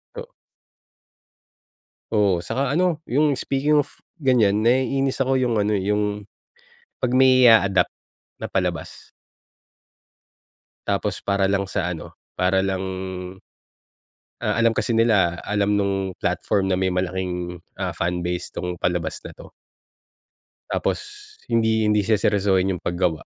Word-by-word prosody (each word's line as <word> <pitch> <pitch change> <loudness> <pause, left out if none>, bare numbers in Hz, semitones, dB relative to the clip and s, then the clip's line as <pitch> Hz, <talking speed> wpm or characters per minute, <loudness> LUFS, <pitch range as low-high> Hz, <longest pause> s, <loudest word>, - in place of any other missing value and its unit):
Oo. 485 0 -7 1.8
Oo, 100 -5 +2
saka 125 +9 -2
ano, 170 -1 +1
yung 145 +1 +1
speaking 145 +3 +1
of, - - -20 0.2
ganyan 110 -5 +3
naiinis 130 +3 +1
ako 135 0 +2
yung 120 -4 +1
ano, 105 +1 +1
eh, 100 +1 -1
yung 105 0 -1 0.8
'pag 125 0 0
may 130 -1 +6
i-a-adopt 100 -4 +4 0.5
na - - -2
palabas. - - -3 1.8
Tapos - - -1
para 100 -1 0
lang 100 0 0
sa 90 -1 -2
ano, 80 - -8 0.2
para 95 +1 +2
lang 95 -1 -1 1.6
ah, 110 -3 0
alam 115 - +5
kasi 115 +1 -1
nila, 100 -7 +2
alam 105 0 0
nung 95 -2 0
platform 95 -2 0
na 90 - +1
may 95 -1 0
malaking, 90 -1 -3 0.2
ah, - - -3
fan 90 0 -2
base 90 0 -4
'tong 90 -1 -4
palabas 85 -2 -1
na - - -8
'to. - - -13 1.2
Tapos - - -1 0.5
hindi 110 -2 +2
hindi 105 -1 +2
seseryosohin 100 -3 +2
yung - - -10
paggawa. 85 -2 -1
105 Hz, 125 wpm, -22 LUFS, 95-120 Hz, 1.8 s, may